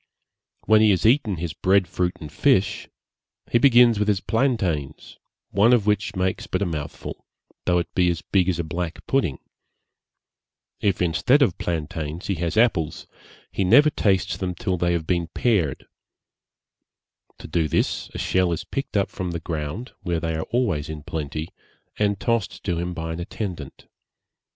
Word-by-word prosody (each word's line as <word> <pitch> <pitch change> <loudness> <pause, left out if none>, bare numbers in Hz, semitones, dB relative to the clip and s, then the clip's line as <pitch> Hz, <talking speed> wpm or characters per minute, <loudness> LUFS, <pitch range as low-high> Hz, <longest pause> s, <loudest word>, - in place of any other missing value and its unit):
When 110 0 +5
he 110 - +5
has 95 -2 +2
eaten 115 -4 +3
his 85 -2 -4
bread 95 +3 +2
fruit 90 +1 -1
and 75 -3 -8
fish, - - +1 0.6
he 120 - +4
begins 120 -3 +6
with 105 - +1
his 105 -2 +2
plantains, 95 - -1 0.3
one 105 +6 +4
of 115 -5 +3
which 105 0 0
makes 95 0 -1
but 90 +2 -1
a - - 0
mouthful, 75 -4 -6 0.4
though 90 -1 +3
it 85 - -2
be 90 -1 +3
as 85 -2 -2
big 95 -2 +1
as 90 - 0
a 85 - -1
black 85 +1 -5
pudding; 125 - 0 1.4
if 95 -3 +1
instead 125 - +3
of 95 -9 0
plantains 80 0 -4
he 100 - 0
has 85 +1 -2
apples, 100 -10 +2 0.5
he 100 - -1
never 140 +11 +6
tastes 95 -8 +1
them 90 -2 -3
till 90 +2 -1
they 85 0 +1
have 85 -2 -1
been 85 -1 0
pared; 95 - +1 1.5
to - - -10
do 80 0 0
this - - -1
a - - -3
shell 95 -2 +1
is 85 - -2
picked 135 -6 -3
up 100 - 0
from 95 -2 -4
the 85 -1 -3
ground, 80 - -5
where 85 -2 -1
they 80 0 -2
are 80 - -4
always 90 - 0
in 75 -2 -6
plenty, 80 +1 -4 0.5
and 100 -2 +1
tossed 115 -4 -1
to 85 -3 -1
him 90 +1 -3
by 80 0 -4
an 80 - -6
attendant. 85 -5 -6
90 Hz, 170 wpm, -23 LUFS, 80-105 Hz, 1.5 s, begins